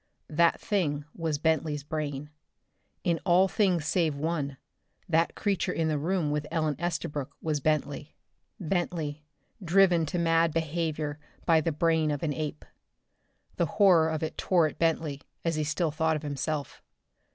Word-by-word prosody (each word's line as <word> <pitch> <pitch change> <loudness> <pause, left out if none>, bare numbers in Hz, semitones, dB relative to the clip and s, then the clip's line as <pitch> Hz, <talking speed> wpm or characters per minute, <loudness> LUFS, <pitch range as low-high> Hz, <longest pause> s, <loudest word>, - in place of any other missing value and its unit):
That 170 +2 +3
thing 150 -8 -1
was 160 -3 -2
"Bentley's" 155 -2 0
brain. 150 -1 -4 0.7
In 170 -2 +1
all 185 +1 +5
things 185 -5 +1
save 160 -3 +1
one 145 -2 -2 0.5
that 165 -1 +2
creature 195 -3 0
in 165 -2 0
the 155 - +1
room 165 -1 0
with 150 0 -2
Ellen 155 -3 0
Estabrook 150 -5 -3
was 155 -2 -1
Bentley. 145 0 -1 0.4
Bentley, 165 -4 -2 0.4
driven 175 -2 +4
to 180 - -2
mad 165 -1 +3
behavior 155 -2 -2 0.3
by 165 -2 +5
the 165 - 0
brain 160 0 +2
of 145 0 -2
an 150 -3 0
ape! 150 0 -4 0.9
The 170 - +2
horror 180 -6 +6
of 160 0 -2
it 160 - -4
tore 175 -4 +3
at 155 - -4
Bentley, 160 -4 0 0.2
as 165 - +1
he 155 -1 0
still 155 +2 0
thought 160 +1 +1
of 155 - -4
himself. 145 -1 -3
160 Hz, 150 wpm, -28 LUFS, 150-170 Hz, 0.9 s, horror